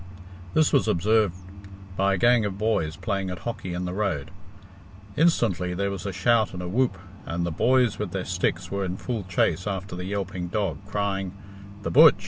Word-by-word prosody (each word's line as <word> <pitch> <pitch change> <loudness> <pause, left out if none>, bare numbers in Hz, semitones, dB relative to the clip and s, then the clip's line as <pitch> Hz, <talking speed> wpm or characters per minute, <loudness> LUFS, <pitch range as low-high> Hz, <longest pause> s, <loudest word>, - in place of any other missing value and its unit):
This 155 -2 +4
was 135 -5 +4
observed 105 0 +2 0.6
by 100 +1 +2
a - - -2
gang 120 +3 +4
of 100 -2 -3
boys 100 -7 0
playing 95 +2 -2
at 90 - -4
hockey 105 -6 -4
in 90 +1 -2
the 90 - -3
road. 95 -9 -1 0.8
Instantly 100 - +2
there 100 +2 -1
was 100 0 -5
a - - -2
shout 110 +3 +2
and 90 - -5
a - - -4
whoop, 115 +1 +1 0.3
and 85 +1 -1
the 85 - -2
boys 125 +5 +2
with 105 -3 -2
their 95 +1 -3
sticks 90 0 -1
were 100 0 -1
in 90 0 -3
full 115 -5 -4
chase 90 0 +1
after 95 -2 -4
the 90 0 -5
yelping 95 -2 -3
dog, 95 -2 -1
crying, 100 -2 -2 0.5
"The - - -2
butch! 150 -1 +8
95 Hz, 190 wpm, -26 LUFS, 90-110 Hz, 0.8 s, butch